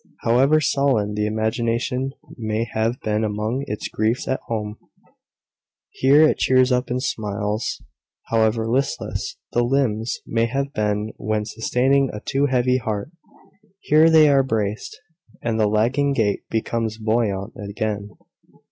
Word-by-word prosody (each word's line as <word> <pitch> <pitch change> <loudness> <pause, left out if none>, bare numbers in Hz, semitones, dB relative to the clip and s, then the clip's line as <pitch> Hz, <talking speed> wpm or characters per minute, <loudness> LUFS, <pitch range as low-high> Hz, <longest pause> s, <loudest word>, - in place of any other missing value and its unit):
However 135 +6 +4
sullen 135 -8 +1
the 105 0 -1
imagination 115 +4 -1 0.2
may 110 0 -2
have 115 +3 0
been 110 0 0
among 110 +5 -2
its 105 - -4
griefs 110 +3 -1
at 130 - 0
home, 105 -2 -3 1.1
here 140 +4 +5
it - - 0
cheers 130 0 +3
up 125 0 +1
and 125 +1 -2
smiles. 105 -1 -2 0.5
However 110 0 +2
listless 130 +4 -2
the 120 - +2
limbs 120 -3 0
may 115 0 0
have 140 +3 -2
been 105 0 -1
when 110 0 -2
sustaining 130 +5 +1
a 105 - -6
too 140 +6 0
heavy 125 -1 +2
heart, 110 +3 -4 0.7
here 155 -2 +4
they 160 -2 +7
are 140 -2 +5
braced, 110 -5 -3 0.4
and 115 -1 -1
the 105 - +3
lagging 125 +7 +1
gait 105 -6 0
becomes 110 0 -2
buoyant 110 -2 -1
again. 105 0 -3
115 Hz, 135 wpm, -22 LUFS, 110-130 Hz, 1.1 s, they